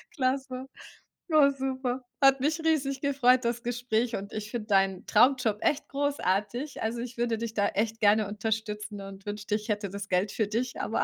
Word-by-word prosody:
Klasse, 260 -2 -1 0.7
oh 295 -2 +7
super, 260 -1 -2 0.2
hat 270 0 +6
mich 305 +4 +1
riesig 275 -4 +1
gefreut 255 -3 +3
das 235 +1 -1
Gespräch 245 -1 -1
und 200 +1 -6
ich 215 0 -5
finde 225 -3 -4
deinen 195 -3 +2
Traumjob 245 -4 +4
echt 295 0 +1
großartig. 275 -2 -1
Also, 230 +2 -2
ich 240 0 -6
würde 235 -1 0
dich 230 -1 -4
da 205 -1 +2
echt 225 +2 -1
gerne 210 0 +4
unterstützen 210 0 -3
und 195 0 -10
wünschte, 210 0 -2
ich 215 +1 -5
hätte 205 -1 -1
das 200 +1 -7
Geld 185 +2 +1
für 220 - 0
dich, 240 +4 -2
aber 225 - 0
230 Hz, 180 wpm, -28 LUFS, 210-260 Hz, 0.7 s, oh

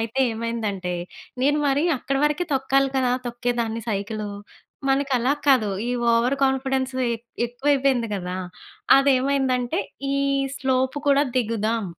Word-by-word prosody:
అయితే 230 +4 -2
ఏమైందంటే, 215 -6 -3 0.5
నేను 290 +2 +3
మరీ 280 +4 +2 0.2
అక్కడి 275 0 -1
వరకే 300 +4 -1
తొక్కాలి 270 0 +2
కదా! 250 -1 +2 0.2
తొక్కేదాన్ని 235 -1 -2
సైకిలు. 210 +1 -3 0.6
మనకి 270 0 +1
అలా 245 +2 +1 0.2
కాదు. 255 -6 +4 0.2
ఈ - - 0 0.2
ఓవర్ 235 +4 +2
కాన్ఫిడెన్సు 265 -1 0 0.2
ఎ - - 0 0.3
ఎక్కువైపోయింది 265 -1 +1
కదా! 180 -2 -4 0.6
అదేవైందంటే 270 +1 +2 0.4
ఈ - - +1 0.4
స్లోపు 260 0 0
కూడా 280 0 +5
దిగుదాం, 225 -2 0
255 Hz, 120 wpm, -23 LUFS, 230-275 Hz, 0.6 s, కూడా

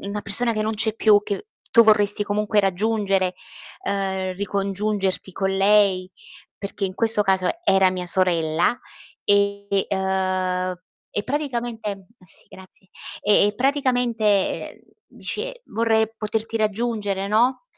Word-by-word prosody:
una 200 +1 -4
persona 230 +4 +1
che 215 - -2
non 220 +1 -1
c'è 220 0 +2
più, 210 -2 +4
che 205 - -5 0.2
tu 230 - +7
vorresti 210 -1 +4
comunque 210 +1 +1
raggiungere, 195 -1 0 0.5
ehm, 190 -1 -2
ricongiungerti 200 0 -2
con 195 +2 -1
lei, 195 -2 +3 0.5
perché 200 0 -4
in 185 -1 -3
questo 225 0 +2
caso 190 -2 +1 0.2
era 195 - +4
mia 180 -1 -4
sorella. 170 +2 +2 0.5
E 200 -1 +1
ehm, 185 -1 -1 0.4
e 205 - -2
praticamente, 235 -8 -3 0.2
sì 180 - -11
grazie. 190 0 -15 0.3
E 205 0 +4
praticamente, 250 -4 +1 0.5
ehm, - - -18 0.3
dice: - - -6
"Vorrei 220 0 +1
poterti 220 +1 -3
raggiungere" 210 -2 -1
no? 240 - +2
205 Hz, 120 wpm, -22 LUFS, 190-220 Hz, 0.5 s, tu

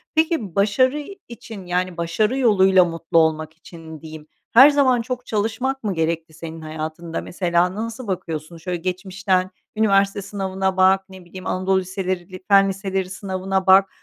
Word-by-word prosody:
Peki, 315 - 0
başarı 255 +8 +2 0.3
için, 225 -4 -10
yani, 180 0 -2
başarı 210 +9 0
yoluyla 190 -7 +5
mutlu 165 0 -2
olmak 155 -1 +2
için 160 -3 -12
diyeyim, 155 -1 -10 0.3
her 265 +5 +9
zaman 265 -4 +3
çok 250 +1 -5
çalışmak 225 +5 -2
mı 205 -3 -1
gerekti 165 0 -2
senin 160 0 -8
hayatında? 155 +2 -5
Mesela 175 0 0
nasıl 230 +2 -5
bakıyorsun, 170 -3 -5
şöyle 175 +2 -4
geçmişten 185 +1 -1 0.3
üniversite 200 -2 +2
sınavına 190 -1 -3
bak, 190 +1 +4
ne 190 -2 -13
bileyim, 185 +1 -9
Anadolu 190 +1 +1
liseleri, 185 -1 -5
Fen 195 -1 +5
liseleri 195 -1 -3
sınavına 190 0 -3
bak, 190 +1 +6
190 Hz, 145 wpm, -21 LUFS, 170-205 Hz, 0.3 s, her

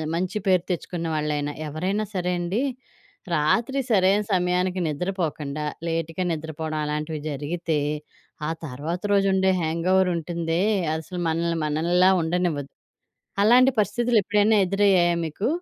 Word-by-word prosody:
మంచి 185 +4 -2
పేరు 185 -2 +4
తెచ్చుకున్న 170 -1 -3
వాళ్ళైనా, 150 -1 -1
ఎవరైనా 185 +8 -2
సరే 180 0 0
అండి. 185 +8 -1 0.7
రాత్రి 230 - +1
సరైన 195 0 +4
సమయానికి 180 0 +1
నిద్రపోకుండా, 155 -3 -3 0.2
లేట్‌గా 165 +2 -2
నిద్రపోవడం 160 -1 -4
అలాంటివి 150 +1 -3
జరిగితే, 150 +2 -2 0.7
ఆ - - -1 0.2
తర్వాత 155 +6 -4
రోజు 195 -1 +3
ఉండే 190 0 +3
హ్యాంగోవర్ 180 +4 +2
ఉంటుందే, 170 +1 -2 0.3
అసలు 175 +3 -5
మనల్ని 165 +1 0
మనల్లా 170 +5 +3
ఉండనివ్వదు. 160 -4 -1 0.7
అలాంటి 250 +4 +6
పరిస్థితులు 230 +3 +1
ఎప్పుడైనా 210 +2 +3
ఎదురయ్యాయా 185 -3 +3
మీకు? 175 +8 -3
175 Hz, 115 wpm, -24 LUFS, 155-190 Hz, 0.7 s, అలాంటి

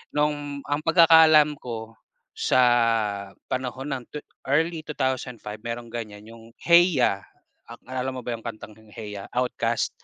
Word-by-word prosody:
nung 145 -1 -1
ang 145 +1 -2
pagkakaalam 160 -3 +6
ko 115 -2 -7 0.3
sa, 115 -5 +2 0.2
panahon 130 +2 -3
ng 130 -2 -3
twe 150 - -6 0.2
early 160 +4 +1
2005 125 -6 -3
mayron 120 0 -5
ganyan, 105 -3 -7
yung 115 +1 -15
"Hey 175 +1 +6
Ya!" 100 -6 +1 0.4
Ak 115 0 -12
naalala 130 +1 -4
mo 130 - -5
ba 120 - -4
yung 115 - -21
kantang 110 -1 -7 0.2
"Hey 105 -3 -7
Ya" - - -9
OutKast? 120 -2 0
125 Hz, 145 wpm, -25 LUFS, 115-145 Hz, 0.4 s, pagkakaalam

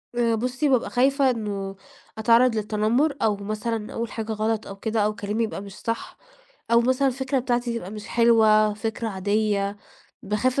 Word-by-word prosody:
آآ 235 -1 +2
بُصّي، 255 +6 -1
بابقى 255 -3 +2
خايفة 270 +2 +3
إنه 200 -5 -3 0.4
أتعرّض 230 +2 +4
للتنمُّر 220 +7 +1
أو 215 -2 +2
مثلًا 215 +2 -4
أقول 230 -1 -3
حاجة 225 -1 -4
غلط 220 0 -1
أو 195 - -7
كده 220 +3 -2
أو 215 0 -1
كلامي 210 +3 -2
يبقى 220 - -4
مش 200 -1 -10
صح 230 0 -4 0.5
أو 235 0 +6
مثلًا 260 +3 +2
الفكرة 265 +1 -1
بتاعتي 240 -2 -1
تبقى 185 -3 -8
مش 210 0 -8
حلوة، 220 -2 +4
فكرة 225 +2 -3
عادية. 205 0 0 0.5
باخاف 230 +7 0
225 Hz, 165 wpm, -24 LUFS, 210-240 Hz, 0.5 s, أو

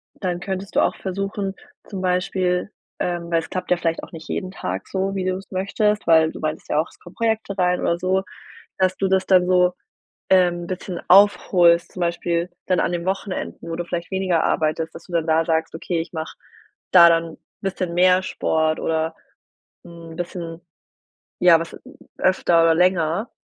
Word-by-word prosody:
dann 180 -3 -3
könntest 190 +1 -5
du - - +4
auch - - +1
versuchen, 195 +1 -3 0.3
zum 195 -3 -6
Beispiel 180 +1 0 0.3
ähm, 175 -1 -2
weil 165 - +3
es 165 - -8
klappt 180 -1 -4
ja - - +6
vielleicht 165 -1 -2
auch - - -10
nicht 160 -1 -10
jeden 185 - -3
Tag 95 - -5
so, 195 +1 -2
wie 190 -1 -2
du 185 0 0
es 195 - -13
möchtest, 205 +1 0
weil 160 -1 +5
du - - -10
meintest 155 0 -4
ja 150 - +2
auch, 160 - 0
es - - -22
kommen 175 - -15
Projekte 220 -3 -1
rein 180 0 +1
oder 170 - +1
so, 190 +1 +1 0.5
dass 185 0 +2
du 195 - 0
das 190 0 +2
dann 180 -1 +4
so, 180 -1 +3 0.6
ähm, 175 -2 +3
bisschen 185 -1 -5
aufholst, 180 -3 +5
zum 185 - -8
Beispiel 170 0 -1 0.2
dann 185 -2 +2
an - - 0
den 175 +1 -3
Wochenenden, 190 -2 -4
wo 165 - -3
du 175 - -3
vielleicht 175 +1 -5
weniger 190 -3 +1
arbeitest, 160 +1 0
dass - - -11
du 180 - -14
dann 165 -2 0
da 160 0 +3
sagst: 160 -1 0
„Okay, 165 +1 -2
ich 165 +1 -6
mache 160 -1 -5 0.6
da 170 -2 +9
dann 165 -1 0 0.3
bisschen 185 -3 -3
mehr 185 +1 +4
Sport 160 -3 0
oder 160 0 -1 0.7
'n 170 -1 -11
bisschen 170 -1 -6 0.8
ja, 175 -2 +6
was 165 - -7 0.4
öfter 175 -2 +3
oder 165 -1 +4
länger.“ 180 +3 +1
180 Hz, 185 wpm, -22 LUFS, 165-185 Hz, 0.8 s, da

